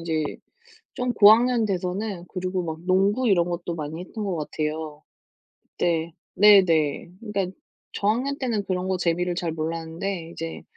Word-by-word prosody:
이제 160 -2 -1 0.7
좀 250 -2 -1
고학년 230 +3 +6
돼서는 185 0 -3
그리고 185 -1 -3
막 160 0 -5
농구 200 +6 +2
이런 175 -3 +3
것도 170 0 -3
많이 155 +1 -5
했던 210 +4 -6
것 185 -4 -2
같아요. 155 0 -4 0.8
네. 165 -1 0 0.2
네네. 175 -6 +5
그니까 205 -4 -2 0.5
저학년 245 +7 0
때는 230 -6 -1
그런 185 -1 -2
거 190 - +1
재미를 175 +1 0
잘 170 -2 -2
몰랐는데 165 +2 -4
이제 165 -1 -6
180 Hz, 285 characters per minute, -24 LUFS, 165-205 Hz, 0.8 s, 고학년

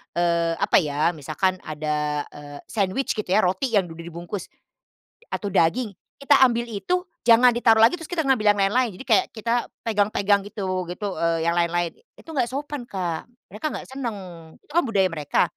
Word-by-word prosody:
eee, 170 -1 +1
apa - - +3
ya, 150 +1 +1
misalkan 175 +4 -1
ada, 150 -1 -2
eee, 145 -1 -10
sandwich, 205 +5 -1
gitu 215 - -3
ya, 190 +4 +3
roti 190 +7 0
yang 185 -4 +2
udah 165 +1 -9
dibungkus 175 +3 -6 0.8
atau 205 - -4
daging, 210 +8 +2 0.3
kita 275 - +4
ambil 235 -1 -1
itu 360 - -1 0.2
jangan 240 +2 +7
ditaruh 225 -2 +4
lagi 250 +10 +4
terus 325 - -8
kita 345 -3 -1
ngambil 260 -6 +2
yang - - -7
lain-lain, 225 +1 +1
jadi 265 - -10
kayak 375 - +4
kita 230 +1 -1 0.3
pegang-pegang 205 -2 +2
gitu 185 -3 -3
gitu, 195 +3 -4
eee, 165 -1 +1
yang 170 - +2
lain-lain. 170 0 +1 0.2
Itu 325 - -12
enggak 260 -6 0
sopan 280 0 -5
Kak. 175 -6 -3 0.2
Mereka 210 +9 -7
enggak - - -7
senang, 250 -5 -4 0.5
itu - - -20
kan 345 +3 +3
budaya 195 -5 +2
mereka 150 -3 +1
200 Hz, 175 wpm, -24 LUFS, 170-235 Hz, 0.8 s, jangan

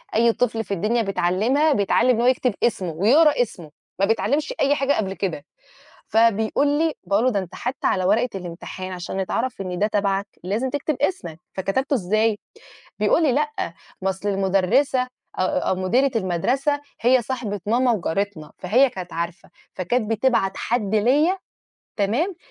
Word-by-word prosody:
أي 230 0 +4
طفل 225 -2 0
في 200 - -4
الدنيا 215 +6 +1
بيتعلِّمها، 220 - +1
بيتعلِّم 205 +5 +2
إن 235 -2 +3
هو 245 - +3
يكتب 255 -3 +2
اسمه 190 -7 0
ويقرا 250 - +4
اسمه، 175 -10 -4 0.3
ما 195 - +4
بيتعلِّمش 285 - 0
أي 280 +1 +3
حاجة 275 +1 +1
قبل 195 -3 -1
كده."، 175 -7 -4 0.6
فبيقول 225 +4 +2
لي، 305 +2 +1
باقول 200 +4 +1
له: 255 - +3
"ده 200 - 0
أنت 185 -2 -7
حتّى 250 +3 -2
على 185 - +1
ورقة 225 +6 +2
الامتحان 185 +1 -7
عشان 180 +1 -5
يتعرَف 230 +3 -2
إن 180 -2 -4
ده 210 - +3
تبعك 200 -1 0 0.2
لازم 215 +8 -1
تكتب 290 +2 -2
اسمك، 170 - -2
فكتبته 230 +9 -1
إزاي؟" 215 0 +1 0.6
بيقول 335 - +3
لي: 290 - +3
"لأ، 295 - -2 0.3
ما 190 - +1
أصل 190 +2 -3
المُدرِّسة 195 +8 +2
أ 255 - -8 0.3
أو 185 0 0
مديرة 240 +9 +2
المَدرسة 250 - 0 0.2
هي 250 +2 +4
صاحبة 215 -5 -4
ماما 245 +3 +3
وجارتنا، 195 -4 -2
فهي 245 +9 +3
كانت 185 -5 -8
عارفة، 170 +1 -5 0.2
فكانت 220 +5 -1
بتبعت 225 -3 +2
حد 220 -3 -1
ليَا، 290 - +3 0.6
تمام، 250 - 0
220 Hz, 160 wpm, -22 LUFS, 190-260 Hz, 0.6 s, أي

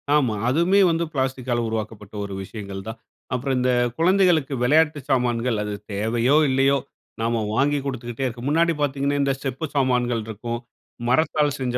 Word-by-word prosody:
ஆமா. 130 -7 +2
அதுவுமே 170 +8 +3
வந்து 165 +1 0
பிளாஸ்டிக்கால 130 -3 -1
உருவாக்கப்பட்ட 110 -2 -5
ஒரு 100 - -7
விஷயங்கள் 100 -1 -7
தான். 110 +1 -6 0.4
அப்பறம் 130 +1 0
இந்த 125 0 +2 0.3
குழந்தைகளுக்கு 170 -4 +3
விளையாட்டு 150 +3 +3
சாமான்கள், 120 -2 +1
அது 105 0 -4 0.2
தேவையோ! 115 +6 +1
இல்லையோ! 135 +1 +3 0.4
நாம 115 0 0
வாங்கி 145 +4 +2
குடுத்துக்கிட்டே 125 -1 -4
இருக்கோம். 120 +1 -4
முன்னாடி 165 +2 +3
பார்த்தீங்கனா, 140 0 0
இந்த 140 -1 +2
செப்பு 135 +3 -3
சாமான்கள் 125 -4 +1
இருக்கும். 115 +2 -4 0.5
மரத்தால் 150 +1 +2
செஞ்ச 125 -2 -1
130 Hz, 145 wpm, -23 LUFS, 115-145 Hz, 0.5 s, அதுவுமே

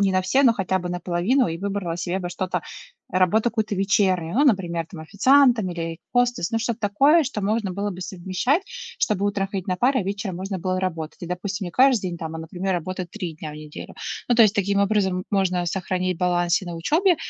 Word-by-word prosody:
не 195 -1 +3
на 185 - +3
все, 225 +10 +2
но 240 - +6
хотя 190 -3 -1
бы 180 - -5
на 180 - -2
половину, 190 +11 +1
и 165 0 -4
выбрала 195 -3 -3
себе 175 +2 -2
бы 180 - -4
что-то 180 0 -2 0.5
работу 185 +4 +3
какую-то 220 -3 0
вечернюю. 190 -3 +1
Ну, 280 +5 +4
например, 175 - +1
там, 170 -3 -10
официантом 235 - +4
или 165 -1 -4 0.2
хостес. 245 -6 +1
Ну, 225 - +1
что-то 235 0 -2
такое, 275 +11 +4
что 250 -5 -3
можно 205 -1 0
было 200 +2 -2
бы 185 -1 -6
совмещать, 190 - -1
чтобы 475 - -2
утром 200 -1 0
ходить 195 -1 -4
на 185 -1 -1
пары, 260 +3 +2
а - - -2
вечером 195 -1 -4
можно 190 +1 -4
было 185 +1 -1
работать. 165 -4 -4
И, 175 - -4
допустим, 190 +3 -3
не 175 - -5
каждый 255 0 +4
день 175 -2 -4
там, 160 0 -5
а, - - -5
например, 180 +4 -3
работать 180 +1 -4
3 180 -7 -5
дня 155 0 -7
в - - -10
неделю. 150 0 -9 0.3
Ну, 245 - +4
то 230 - +7
есть, 210 -2 +4
таким 200 0 +1
образом, 195 -3 +1
можно 185 -3 +1
сохранить 185 0 -2
баланс 175 -1 +2
и 190 - -9
на 170 -1 -5
учебе 325 - +2
190 Hz, 220 wpm, -23 LUFS, 175-215 Hz, 0.5 s, то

